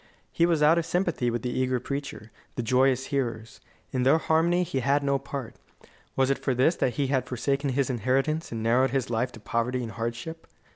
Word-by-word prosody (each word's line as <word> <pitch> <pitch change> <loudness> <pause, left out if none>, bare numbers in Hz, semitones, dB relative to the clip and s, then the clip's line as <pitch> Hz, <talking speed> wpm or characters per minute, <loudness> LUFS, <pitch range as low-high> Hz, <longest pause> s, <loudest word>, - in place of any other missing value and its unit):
He 170 - +2
was 165 -3 +2
out 160 +3 +5
of 165 - -3
sympathy 170 -9 0
with 120 +1 -3
the 125 - -2
eager 130 0 0
preacher, 140 -4 -6 0.2
the 120 - -2
joyous 130 +2 +2
hearers. 115 -5 -3 0.3
In 130 - -1
their 135 +5 +5
harmony 165 +3 +2
he 140 -6 -2
had 140 +3 +1
no 140 -1 +1
part. 135 -3 -6 0.6
Was 135 0 +2
it 135 - 0
for 130 - -1
this 135 +7 +3
that 125 - 0
he 145 - 0
had 130 -1 +1
forsaken 135 +3 -1
his 135 0 +1
inheritance 135 +7 0
and 115 -1 -4
narrowed 125 +4 +3
his 130 -5 -1
life 120 +2 0
to 115 - -11
poverty 120 +4 -1
and 115 - -5
hardship? 120 +9 -5
130 Hz, 205 wpm, -27 LUFS, 120-145 Hz, 0.6 s, out